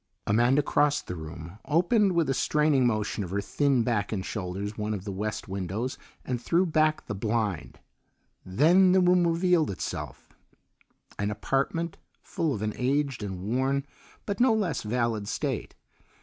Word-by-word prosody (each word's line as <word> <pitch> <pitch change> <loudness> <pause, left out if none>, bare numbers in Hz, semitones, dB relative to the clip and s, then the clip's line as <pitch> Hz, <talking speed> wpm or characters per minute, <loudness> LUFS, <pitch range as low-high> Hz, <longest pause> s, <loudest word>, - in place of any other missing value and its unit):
Amanda 120 +7 +3
crossed 145 +1 +1
the 90 - -5
room, 80 +4 -9
opened 185 +5 +3
with 170 -2 +2
a 135 - +1
straining 150 -2 +2
motion 110 -2 -1
of 90 - -6
her 100 +3 -1
thin 130 +4 +1
back 105 -4 -1
and 95 -3 -3
shoulders 100 +1 -4
one 105 0 -2
of 95 - -6
the 100 - -4
west 105 +3 -4
windows, 100 +6 -3 0.3
and 125 -2 -2
threw 175 +8 +2
back 155 -2 +1
the - - -4
blind. 105 -4 -2 0.7
Then 170 - +4
the 190 - +5
room 180 -1 +4
revealed 170 -1 +2
itself 95 - -6 0.9
an 100 0 0
apartment 135 +10 -1 0.3
full 160 -2 -1
of 110 -5 -3
an 105 0 -1
aged 135 0 0
and 95 -3 -5
worn 130 +6 0 0.4
but 200 +1 -3
no 245 -2 +5
less 180 -10 -1
valid 115 -2 -1
state. - - -3
125 Hz, 160 wpm, -27 LUFS, 105-155 Hz, 0.9 s, the